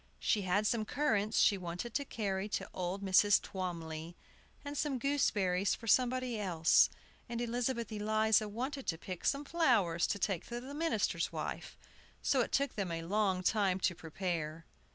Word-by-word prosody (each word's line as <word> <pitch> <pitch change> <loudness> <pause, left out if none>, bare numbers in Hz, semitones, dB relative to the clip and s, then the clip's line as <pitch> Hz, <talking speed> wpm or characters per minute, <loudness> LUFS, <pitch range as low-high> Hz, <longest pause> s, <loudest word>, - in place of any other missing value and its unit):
She 210 - +1
had 195 +3 +1
some 220 0 +1
currants 220 -4 0
she 200 -2 +4
wanted 180 +6 -5
to 280 - -1
carry 200 -4 -2
to - - -2
old 185 +2 -3
Mrs. 195 +1 +5
Twomly, 170 -3 -5 0.5
and 285 0 -5
some 290 -2 -1
gooseberries 205 -9 +1
for - - -12
somebody 250 0 +2
else, 170 -5 +4 0.4
and 235 -1 -3
Elizabeth 240 0 -1
Eliza 215 0 +2
wanted 260 +6 -4
to 165 - 0
pick 180 +1 -7
some 285 +1 0
flowers 230 - +2
to - - -1
take 195 -3 -2
to 240 0 -4
the 260 +3 -9
minister's 325 +2 0
wife, - - -5 0.5
so 265 - +3
it - - -2
took 280 -1 +1
them 195 -5 -3
a 165 0 -3
long 190 0 +1
time 195 -2 +2
to 185 - +2
prepare. 165 -1 -4
210 Hz, 165 wpm, -33 LUFS, 180-240 Hz, 0.5 s, Mrs